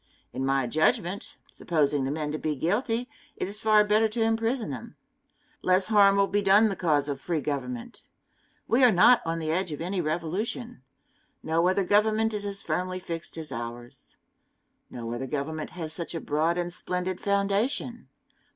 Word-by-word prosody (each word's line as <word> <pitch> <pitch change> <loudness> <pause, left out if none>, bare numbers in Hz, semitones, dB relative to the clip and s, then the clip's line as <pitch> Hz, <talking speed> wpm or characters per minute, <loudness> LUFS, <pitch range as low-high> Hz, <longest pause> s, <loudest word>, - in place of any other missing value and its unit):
In 130 - -3
my 135 -1 +1
judgment, 170 - 0 0.2
supposing 145 -4 0
the - - -2
men 150 0 -2
to 155 - -3
be 155 -1 -2
guilty, 225 - 0 0.3
it - - -3
is 205 +2 -4
far 215 -1 +5
better 210 +1 +3
to 225 +2 -3
imprison 225 - 0
them. 125 -4 -8 0.7
Less 185 +2 +2
harm 200 -2 +6
will 200 0 +4
be 205 +1 0
done 205 +3 +5
the 195 - -2
cause 150 -6 +1
of 140 -2 -4
free 170 -3 -1
government. 130 -5 -5 0.6
We 240 +4 +3
are 250 - +8
not 220 +7 +6
on 165 0 -1
the 160 -1 -2
edge 180 +1 0
of 150 - -5
any 180 +3 -2
revolution. 175 - -3 0.6
No 165 +2 +1
other 190 +2 +2
government 215 +3 +2
is 205 -1 -3
as 200 -1 -4
firmly 185 0 -2
fixed 165 -2 -7
as 155 -3 -7
ours. 120 0 -8 0.7
No 115 -1 -6
other 130 +3 -4
government 155 +2 -4
has 160 -2 -4
such 170 0 -4
a - - -2
broad 160 +3 0
and 175 0 -2
splendid 180 0 -3
foundation. 205 +5 0
180 Hz, 175 wpm, -27 LUFS, 155-205 Hz, 0.7 s, are